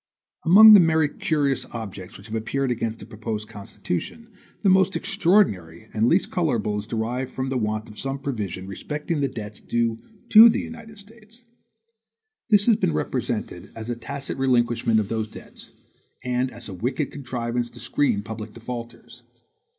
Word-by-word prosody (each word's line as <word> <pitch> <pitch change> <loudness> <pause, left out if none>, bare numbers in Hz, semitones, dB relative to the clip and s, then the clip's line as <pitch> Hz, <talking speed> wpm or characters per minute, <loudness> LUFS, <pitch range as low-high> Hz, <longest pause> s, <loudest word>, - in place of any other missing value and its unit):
Among 215 +6 +10
the 205 - +10
many 160 -3 +3
curious 145 -4 -1
objections 100 -5 -7
which - - -16
have 110 - -4
appeared 130 +4 -1
against 115 -1 -2
the - - -11
proposed 110 0 -5
Constitution, 105 - -6 0.3
the - - +3
most 190 +1 +4
extraordinary 110 - +1
and 110 +1 +1
the - - +3
least 175 +9 +2
colorable 115 - 0
is 105 - -7
derived 120 +3 -3
from 130 0 -3
the 135 - -1
want 110 0 -2
of 105 - -9
some 135 +1 -3
provision 105 -9 -4
respecting 150 - -4
the 140 - +2
debts 105 -4 -8
due 115 -1 -1 0.3
to 225 +2 +10
the 225 - 0
United 225 -2 -9
States. 220 +3 -14 1.0
This 205 -2 +5
has 230 -3 +4
been 80 - 0
represented 75 - -3
as 115 +1 -5
a - - -2
tacit 140 +3 -6
relinquishment 120 -3 +2
of 105 - -2
those 110 -1 -3
debts, - - -10 0.5
and 125 +1 0
as 120 -1 -11
a 100 - -7
wicked 130 - -2
contrivance 120 -3 -3
to - - -14
screen 105 -8 0
public 110 0 -7
defaulters. 120 0 -9
120 Hz, 165 wpm, -24 LUFS, 110-150 Hz, 1.0 s, Among